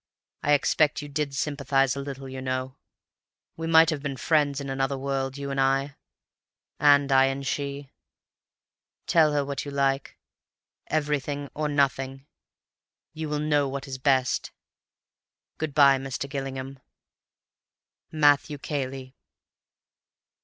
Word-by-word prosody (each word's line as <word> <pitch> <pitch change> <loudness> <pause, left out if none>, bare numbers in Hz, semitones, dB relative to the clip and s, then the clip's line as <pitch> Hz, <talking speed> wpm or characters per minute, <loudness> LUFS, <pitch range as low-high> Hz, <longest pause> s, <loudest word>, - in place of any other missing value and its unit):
I 150 - +2
expect 145 +1 +2
you 145 - -8
did 145 -1 -2
sympathize 140 -2 +1
a - - -4
little, 135 -1 -7
you 130 0 -7
know. 130 0 -3 0.8
We 165 0 -4
might 165 0 +6
have 150 -3 -3
been 140 -2 -4
friends 145 -1 +1
in 140 - -6
another 135 0 -1
world—you 135 +1 -3
and 135 0 0
I, 135 +1 +1 0.8
and 145 -1 +5
I 135 0 +6
and 135 +1 -2
she. 140 0 -4 1.1
Tell 160 -3 +4
her 145 -1 +1
what 140 -1 -4
you 145 - -6
like. 135 -1 -1 0.7
Everything 145 -2 -2
or 150 0 -2
nothing. 135 -1 0 0.9
You 155 -1 -5
will 150 - -1
know 150 -2 +1
what 140 +1 -5
is 130 -1 -6
best. 130 -2 +1 1.1
Good 155 -3 -3
bye, 140 -2 +6
Mr. 135 0 -4
Gillingham. 135 -1 -5 1.3
"MATTHEW 145 -1 +3
CAYLEY. 135 -2 -5
140 Hz, 125 wpm, -26 LUFS, 135-145 Hz, 1.3 s, might